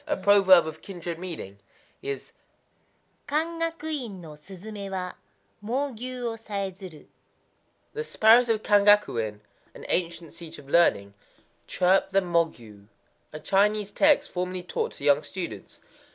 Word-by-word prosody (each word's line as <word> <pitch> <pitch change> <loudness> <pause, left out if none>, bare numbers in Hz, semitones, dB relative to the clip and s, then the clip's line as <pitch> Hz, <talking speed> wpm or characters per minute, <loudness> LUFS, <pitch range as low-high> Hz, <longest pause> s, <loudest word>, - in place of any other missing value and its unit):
A 295 - 0
proverb 195 -4 +6
of 160 -1 -7
kindred 175 -3 -7
meaning 160 - -7 0.4
is, 415 +1 -5 1.0
Kangaku 320 -2 -2
In 200 -5 -9
no 165 -3 -11
suzumé 195 +6 -9
wa, 185 -1 -4 0.5
Mōgyū 250 +1 -3
wo 230 -1 -3
sayézuru: 195 -6 -6 0.9
"The 450 +1 -3
sparrows 235 - +5
of 220 -1 +1
Kangaku 205 - +4
In 105 -1 -7 0.3
[an - - -11
ancient 170 -2 -1
seat 165 -1 -10
of 140 - -14
learning] 100 -11 +3 0.5
chirp 185 +1 +2
the 195 - +3
Mōgyū,"—a 155 - -5
Chinese 205 +1 +1
text 295 +2 +3
formerly 180 0 -3
taught - - -3
to - - -10
young 145 0 +4
students. 145 - -7
190 Hz, 125 wpm, -26 LUFS, 165-225 Hz, 1.0 s, proverb